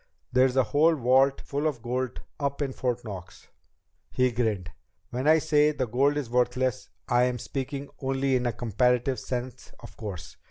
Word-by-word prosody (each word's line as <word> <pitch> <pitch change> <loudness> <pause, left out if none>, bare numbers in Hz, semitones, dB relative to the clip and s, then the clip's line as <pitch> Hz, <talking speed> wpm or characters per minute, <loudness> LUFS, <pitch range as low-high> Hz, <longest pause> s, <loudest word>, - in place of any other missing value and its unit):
There's 130 0 +4
a 130 - +5
whole 150 +8 +3
vault 135 +1 +3
full 145 +2 -2
of 125 -7 -3
gold 125 +1 -2 0.2
up 140 0 -1
in 135 -2 -3
Fort 125 -2 -2
Knox." 95 -4 -9 0.6
He 130 0 +2
grinned. 105 -7 -1 0.4
"When 130 +4 -2
I 160 +1 +7
say 150 -1 +3
the 130 - -1
gold 135 +5 +2
is 145 -4 -2
worthless, 125 +1 0 0.2
I 120 0 +4
am 125 -1 -1
speaking 140 +3 -4
only 135 0 0
in 125 -1 +1
a - - +1
comparative 125 +3 +1
sense 125 -1 -5
of - - -12
course. 90 -6 -7
130 Hz, 170 wpm, -27 LUFS, 120-140 Hz, 0.6 s, I